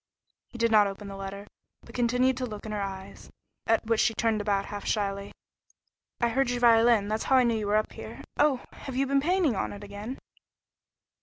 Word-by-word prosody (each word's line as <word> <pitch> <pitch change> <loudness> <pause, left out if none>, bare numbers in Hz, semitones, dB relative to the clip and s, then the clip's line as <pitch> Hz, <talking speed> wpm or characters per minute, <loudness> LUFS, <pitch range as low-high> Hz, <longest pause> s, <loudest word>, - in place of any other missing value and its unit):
He 245 - -10
did 230 -1 +2
not 210 -2 +6
open 200 +1 -7
the 195 - -7
letter, 195 +1 -7 0.4
but 230 - -14
continued 250 +2 +2
to 255 - -2
look 210 -2 -8
in 215 - -5
her 210 -1 -2
eyes, 195 0 -7 0.4
at 225 0 +2
which 225 0 +1
she 225 - +2
turned 220 -1 +1
about 200 -1 0
half 205 -1 -6
shyly. 200 -1 -2 0.9
"I 235 - +2
heard 265 +2 +1
your 245 0 -1
violin; 230 -3 +5
that's 215 +1 -2
how 265 - +3
I 255 - +6
knew 235 -1 +2
you 210 - -3
were 205 - +2
up 215 0 +1
here. - - -9
Oh! 290 -4 +3
Have 265 - -8
you 270 +1 +2
been 275 0 +2
painting 340 - +2
on - - -2
it 205 0 -9
again?" 205 +5 -7
225 Hz, 215 wpm, -28 LUFS, 205-245 Hz, 0.9 s, not